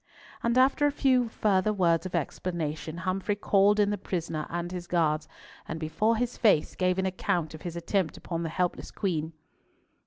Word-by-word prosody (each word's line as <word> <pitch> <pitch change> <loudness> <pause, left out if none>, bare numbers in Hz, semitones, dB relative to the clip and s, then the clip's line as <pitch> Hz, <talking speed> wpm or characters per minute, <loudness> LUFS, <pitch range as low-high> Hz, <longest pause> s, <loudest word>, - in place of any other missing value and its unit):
And 235 +1 +1
after 275 +3 +4
a - - +1
few 255 -4 +2
further 210 -1 +2
words 175 -3 +2
of 180 - -5
explanation, 160 -1 -3
Humfrey 190 +2 0
called 205 0 +3
in 205 0 +3
the 205 - -2
prisoner 165 -5 -3
and 175 +1 -3
his 180 -1 -6
guards, 155 -3 +1 0.4
and 160 - -4
before 165 +9 +1
his 245 +1 -2
face 205 -10 +3
gave 185 0 +1
an 190 - 0
account 185 -3 -1
of 155 - -9
his 175 -2 -6
attempt 170 0 -1
upon 165 -1 -4
the 165 - -2
helpless 180 +2 -2
Queen. 165 -5 -2
185 Hz, 180 wpm, -28 LUFS, 165-205 Hz, 0.4 s, after